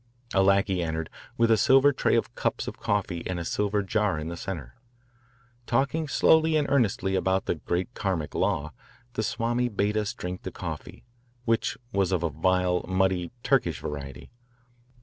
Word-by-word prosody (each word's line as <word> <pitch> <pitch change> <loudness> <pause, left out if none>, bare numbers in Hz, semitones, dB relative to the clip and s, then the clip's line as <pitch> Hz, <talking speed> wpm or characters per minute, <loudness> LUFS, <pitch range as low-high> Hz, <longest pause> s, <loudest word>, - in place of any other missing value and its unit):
A 95 - +4
lackey 100 -1 +3
entered 80 -1 -3 0.3
with 115 -1 +3
a 110 - +6
silver 135 +6 +5
tray - - +2
of - - 0
cups - - -2
of - - -6
coffee 95 -4 -1
and 90 -1 -2
a 85 - -4
silver 105 +2 0
jar 105 -3 +1
in 75 +1 -4
the 85 - -5
centre. 85 -8 -6 0.9
Talking 140 +6 +1
slowly 160 +2 +4
and 145 -2 +1
earnestly 105 -7 +2
about 95 0 +1
the - - +1
"great 90 +8 -3
Karmic 90 -10 -2
law," 75 +1 0 0.4
the - - -1
Swami 120 +3 0
bade 105 0 0
us 105 -1 -1
drink 90 +1 -5
the - - -5
coffee, - - -7 0.4
which 115 -1 +1 0.2
was 95 -2 +1
of 90 -2 +1
a 85 - 0
vile, 90 +3 +1
muddy, 95 -2 +1
Turkish 85 - +2
variety. 70 -3 -7
95 Hz, 170 wpm, -27 LUFS, 85-115 Hz, 0.9 s, a